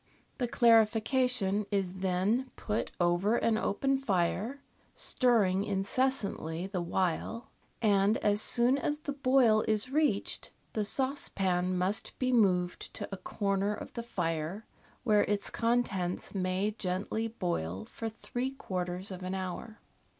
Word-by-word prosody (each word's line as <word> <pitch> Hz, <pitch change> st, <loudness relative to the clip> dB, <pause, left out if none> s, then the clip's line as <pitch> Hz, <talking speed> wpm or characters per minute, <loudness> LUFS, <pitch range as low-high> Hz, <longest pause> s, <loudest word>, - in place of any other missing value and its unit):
The 245 Hz, -, +1 dB
clarification 225 Hz, -2 st, +3 dB
is 190 Hz, -2 st, -1 dB
then 195 Hz, +8 st, +1 dB
put 210 Hz, 0 st, -2 dB
over 175 Hz, +6 st, +2 dB
an 230 Hz, -1 st, +2 dB
open 270 Hz, +6 st, +1 dB
fire 215 Hz, +4 st, -1 dB, 0.3 s
(stirring 205 Hz, -7 st, +2 dB
incessantly 200 Hz, -, -1 dB
the 190 Hz, -2 st, -3 dB
while), 185 Hz, +6 st, -2 dB, 0.3 s
and 205 Hz, 0 st, +4 dB
as 205 Hz, 0 st, +2 dB
soon 245 Hz, +5 st, +4 dB
as 295 Hz, +2 st, -2 dB
the 285 Hz, -, -3 dB
boil 255 Hz, -5 st, +4 dB
is 220 Hz, +4 st, +1 dB
reached 290 Hz, -8 st, 0 dB, 0.2 s
the 215 Hz, -2 st, 0 dB
saucepan 190 Hz, -8 st, 0 dB
must 190 Hz, +3 st, -1 dB
be 255 Hz, -1 st, 0 dB
moved 180 Hz, -6 st, +2 dB
to -, -, -5 dB
a 195 Hz, -, -4 dB
corner 200 Hz, +2 st, -1 dB
of -, -, -9 dB
the 235 Hz, -, -4 dB
fire, 175 Hz, -1 st, -3 dB, 0.4 s
where 210 Hz, -4 st, +4 dB
its 205 Hz, -1 st, -1 dB
contents 230 Hz, -7 st, 0 dB
niay 190 Hz, +2 st, -1 dB
gently 195 Hz, +4 st, -1 dB
boil 105 Hz, -, -3 dB
for 225 Hz, -, -5 dB
three 245 Hz, +3 st, -4 dB
quarters 185 Hz, -6 st, -4 dB
of 185 Hz, -1 st, -7 dB
an 185 Hz, +1 st, -3 dB
hour. 190 Hz, +4 st, -5 dB
205 Hz, 130 wpm, -31 LUFS, 185-235 Hz, 0.4 s, and